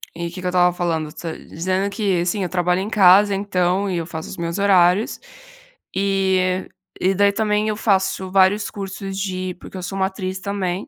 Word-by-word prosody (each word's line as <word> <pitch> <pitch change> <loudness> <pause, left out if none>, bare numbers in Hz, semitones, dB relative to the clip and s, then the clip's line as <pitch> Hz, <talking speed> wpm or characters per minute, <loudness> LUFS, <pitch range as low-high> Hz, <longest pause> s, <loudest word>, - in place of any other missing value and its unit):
e 170 0 -4
o - - -8
que 185 0 -8
que - - -8
eu - - +1
estava 180 -1 +3
falando, 165 -3 -1 0.4
dizendo 185 +4 -1
que, 200 -5 0
assim, 185 +3 -1
eu 175 - -2
trabalho 180 0 +1
em 205 - -4
casa, 200 0 +6
então 195 0 0
e 180 - -1
eu 165 - -2
faço 160 -1 -7
os - - -8
meus 170 +3 -3
horários 190 +1 +3 0.8
e 190 -1 +1 0.3
e 190 +1 +2
daí 200 +1 +4
também 210 0 0
eu 210 - -2
faço 190 -3 0
vários 195 +2 +3
cursos 195 -1 -6
de 185 -2 -3
porque 190 - -9
eu 180 - -6
sou 195 +2 -5
uma 190 0 +2
atriz 190 -1 -5
também. 195 -2 -3
190 Hz, 200 wpm, -21 LUFS, 180-200 Hz, 0.8 s, casa